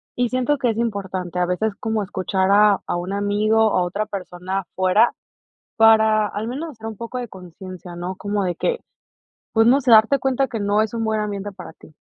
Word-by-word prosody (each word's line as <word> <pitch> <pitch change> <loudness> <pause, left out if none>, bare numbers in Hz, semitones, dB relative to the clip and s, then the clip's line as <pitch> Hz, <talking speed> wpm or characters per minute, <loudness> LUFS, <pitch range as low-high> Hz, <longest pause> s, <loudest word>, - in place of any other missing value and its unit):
y 245 -1 0
siento 255 +4 0
que 245 - +1
es 220 - -6
importante, 190 -6 -3
a 180 - +2
veces 200 +4 -1
como 220 -1 -1
escuchar 190 0 -1
a 205 -1 +5
a - - -1
un 180 +3 -4
amigo, 210 +2 +2
o 215 - +1
a - - +2
otra 200 +4 -2
persona 185 0 -4
afuera, 185 +5 +2 0.6
para 220 -1 +5
al 205 +2 -5
menos, 295 +7 -5
hacer 225 -3 -11
un 220 - -6
poco 235 +2 -6
de 245 -1 -5
conciencia, 180 -1 -11
¿no?, 180 +2 -5
como 205 0 -2
de 180 -1 -1
que, 485 - -1 0.7
pues, 225 0 +4
no 260 +4 +5
se, 250 -2 +1
darte 225 +5 +6
cuenta 265 +1 0
que 225 - -4
no 205 +1 +2
es 220 0 -2
un 225 -1 -2
buen 220 -1 0
ambiente 205 -1 -4
para 180 -3 -10
ti. 155 - -18
210 Hz, 215 wpm, -21 LUFS, 190-225 Hz, 0.7 s, darte